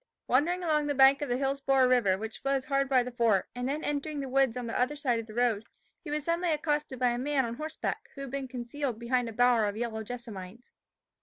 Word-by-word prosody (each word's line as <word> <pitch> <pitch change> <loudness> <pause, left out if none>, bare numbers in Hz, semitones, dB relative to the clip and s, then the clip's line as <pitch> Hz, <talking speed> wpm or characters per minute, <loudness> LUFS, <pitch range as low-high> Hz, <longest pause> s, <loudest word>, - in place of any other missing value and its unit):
Wandering 340 +8 +2
along 305 -3 +1
the 290 - 0
bank 270 +1 +6
of 290 - -2
the 245 - +1
Hillsborough 270 -1 +2
river, 235 -7 +3
which 220 +2 -6
flows 275 -1 0
hard 275 -1 +1
by 255 -2 +4
the 250 - -6
fort, 230 -6 +2
and 245 +1 -3
then 300 +3 -2
entering 295 +1 -2
the 275 - -3
woods 265 -2 +2
on 250 - -4
the 230 - -4
other 255 +4 +1
side 255 -5 0
of 225 - -7
the 215 - -10
road, 235 -4 +1 0.4
he 320 - -7
was 300 0 -2
suddenly 340 +2 0
accosted 295 -3 -1
by 250 0 +2
a 240 0 -1
man 275 0 +1
on 235 0 -5
horseback, 315 +1 -4
who 275 - -7
had 275 -2 -6
been 275 -1 -3
concealed 250 0 -4
behind 235 +1 0
a - - -6
bower 245 -1 +3
of 205 0 -2
yellow 225 -1 -3
jessamines. 225 -2 -8
255 Hz, 240 wpm, -29 LUFS, 235-285 Hz, 0.4 s, bank